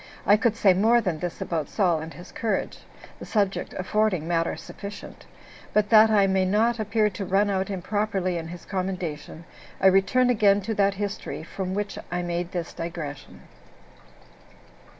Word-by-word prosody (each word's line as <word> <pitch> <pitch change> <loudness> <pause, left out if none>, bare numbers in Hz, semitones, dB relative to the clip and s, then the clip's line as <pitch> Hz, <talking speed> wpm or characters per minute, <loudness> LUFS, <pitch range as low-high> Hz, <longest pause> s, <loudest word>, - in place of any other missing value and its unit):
I 205 - +6
could 220 +1 +1
say 200 -4 +5
more 225 +6 +4
than 180 -8 -2
this 175 0 -5
about 160 -4 -2
Saul 180 -6 +1
and 160 +1 -7
his 175 - -12
courage, 215 -4 -2 0.4
the - - -8
subject 200 -3 -1
affording 185 -3 0
matter 165 -1 0
sufficient; 200 0 -10 0.5
but 210 -1 +2
that 220 -1 +7
I 205 -2 +4
may 190 -1 +2
not 220 +5 +2
appear 215 0 +1
to 195 - -5
run 195 +2 +2
out 190 0 -1
improperly 195 -1 -1
in 165 - -7
his 175 0 -9
commendation, 180 -4 -4 0.3
I - - -1
return 195 +7 +4
again 205 -3 +4
to 220 +3 -3
that 200 -1 +2
history 200 -5 -4
from 185 +2 -4
which 205 0 -3
I 175 0 -1
made 175 0 -3
this 175 -2 -4
digression. 165 -4 -7
195 Hz, 165 wpm, -25 LUFS, 175-210 Hz, 0.5 s, that